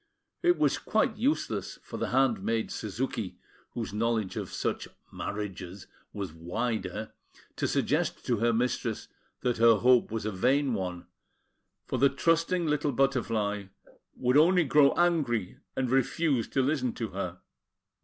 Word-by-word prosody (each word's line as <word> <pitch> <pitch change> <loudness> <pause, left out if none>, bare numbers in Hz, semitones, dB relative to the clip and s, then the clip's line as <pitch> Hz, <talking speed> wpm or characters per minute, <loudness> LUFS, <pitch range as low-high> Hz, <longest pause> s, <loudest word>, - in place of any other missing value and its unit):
It 350 0 +4
was - - +2
quite 220 - +1
useless 270 +8 -1
for - - -7
the - - -1
handmaid, 115 -4 +1
Suzuki, 110 -1 -3 0.4
whose 115 -4 -4
knowledge 110 -2 0
of - - -4
such - - -2 0.2
"marriages" 100 -2 -5 0.3
was 100 -5 -5
wider, 95 +3 -3 0.5
to - - 0
suggest - - 0
to 120 - +1
her 115 +2 +2
mistress 120 -1 -1 0.3
that 120 -1 0
her 115 0 +6
hope 125 +3 +4
was 110 -1 -3
a 110 - -1
vain 130 +7 +2
one; 90 -4 -4 0.8
for - - -2
the 140 - +6
trusting 165 +3 +1
little 150 -1 +1
Butterfly 115 -6 0 0.5
would 125 +2 +2
only 175 +3 +5
grow 145 -1 +5
angry, 150 - +1 0.2
and 130 - 0
refuse 135 -1 +1
to 135 - +1
listen 130 -3 0
to 115 -3 -4
her. 95 -2 -4
120 Hz, 140 wpm, -29 LUFS, 105-140 Hz, 0.8 s, her